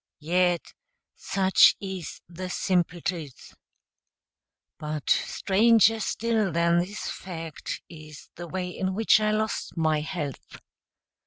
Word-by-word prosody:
yet 175 +2 0 0.4
such 190 -1 +4
is 190 -5 -6
the 180 +2 -7
simple 180 -1 0
truth. 155 -8 -5 1.3
But 150 -2 -5
stranger 225 +2 +3
still 220 -3 0
than 170 +1 +2
this 190 +4 -4
fact 165 -4 -6
is 155 -2 -12
the 175 0 -8
way 185 +1 -3
in 190 +1 -3
which 220 +1 +4
I 215 0 +1
lost 215 -3 -2
my 155 -2 +2
health. 150 -4 -6
180 Hz, 110 wpm, -26 LUFS, 165-195 Hz, 1.3 s, such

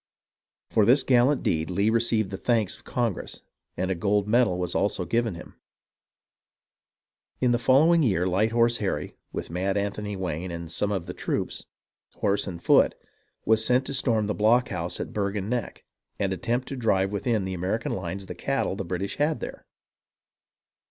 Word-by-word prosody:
For 110 - +4
this 130 +6 +5
gal 125 -1 +4
lant 145 -1 0
deed 80 +1 0
Lee 100 +4 +1
received 115 -3 +1
the 95 - -4
thanks 110 -4 +1
of - - -19
Congress, 120 -7 -3 0.4
and 95 +1 -1
a - - +3
gold 100 +3 +1
medal 110 -5 +3
was 90 -1 -2
also 100 -2 0
given 115 +2 0
him. - - -11 1.9
In 125 -1 +3
the 120 - +2
following 155 +7 +5
year 95 - +2
Light 95 +5 +1
Horse 115 0 +3
Harry, 100 - -3 0.2
with - - -5
Mad 95 +3 -1
Anthony 100 +1 -2
Wayne 90 -1 -3
and 85 -1 -6
some 105 +4 0
of 95 -4 -2
the - - -6
troops, - - -3 0.5
horse 100 0 0
and 85 -3 -7
foot, - - +5 0.5
was 110 0 +3
sent 125 +3 +2
to 140 - -4
storm 115 -5 +1
the 105 - -1
blockhouse 105 -6 +1
at - - -5
Bergen 100 -1 -2
Neck, 120 -3 -3 0.3
and 95 -2 0
attempt 120 +8 -2
to 135 - -4
drive 100 -6 +1
within 105 -1 0
the 95 - -3
American 95 +6 -2
lines 95 +1 -4
the - - -6
cattle 135 -8 -1
the 95 - -4
British 95 +2 -4
had 150 +2 +1
there. - - -8
105 Hz, 175 wpm, -26 LUFS, 95-120 Hz, 1.9 s, this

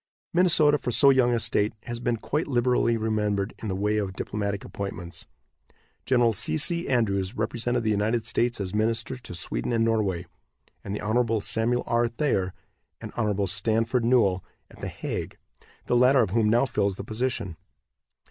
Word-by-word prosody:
Minnesota, 155 -4 +4
for 125 - -4
so 140 +3 +6
young 130 -2 +3
a 120 - +1
state, 105 -1 +1
has 120 -1 -5
been 120 -1 -1
quite 150 +8 -2
liberally 120 -3 +2
remembered 105 -2 -1
in 110 - -4
the 95 - -2
way 105 +2 0
of 100 -3 -2
diplomatic 100 0 -3
appointments. 90 -3 -6 0.8
Gen. 120 -3 +3
C. 115 +8 0
C. 170 +3 +2
Andrews 100 -4 0
represented 120 +2 -1
the 110 - +1
United 110 +2 0
States 120 0 0
as 95 -1 -4
minister 115 +4 0
to 120 -7 -8
Sweden 90 +7 -1
and 115 -1 +2
Norway, 100 -6 0 0.6
and 100 - -4
the - - -5
Hon. 115 +1 +1
Samuel 115 +4 0
R. 120 0 +1
Thayer 115 -7 -1 0.5
and - - -8
Hon. 105 -3 0
Stanford 115 +6 0
Newell 110 -7 +3 0.3
at - - -16
The - - -3
Hague, - - -5 0.5
the - - +1
latter 125 +1 +5
of 100 - -3
whom 110 0 +2
now 120 +4 +3
fills 100 -6 -1
the - - -7
position. 110 -4 -3
115 Hz, 170 wpm, -26 LUFS, 100-120 Hz, 0.8 s, so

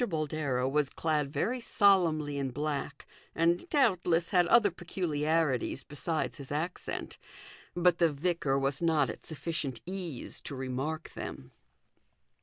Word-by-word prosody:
Boldero 150 -5 -1
was 145 0 +1
clad 150 -3 -1
very 220 - 0
solemnly 170 -10 +3
in 135 -1 -1
black, 145 +2 -3 0.3
and 170 - +2
doubtless 180 - +2
had 180 -3 +4
other 220 -1 +5
peculiarities 160 -6 0
besides 155 +3 -2
his 140 -2 -9
accent; 160 +5 -4 0.6
but 175 -1 +3
the 170 -2 +4
vicar 145 -2 0
was 135 +2 0
not 160 -5 +3
at - - -12
sufficient 155 -5 -4
ease 180 -7 -5
to 140 - -6
remark 135 +5 -3
them. 65 - -7
155 Hz, 125 wpm, -31 LUFS, 140-175 Hz, 0.6 s, other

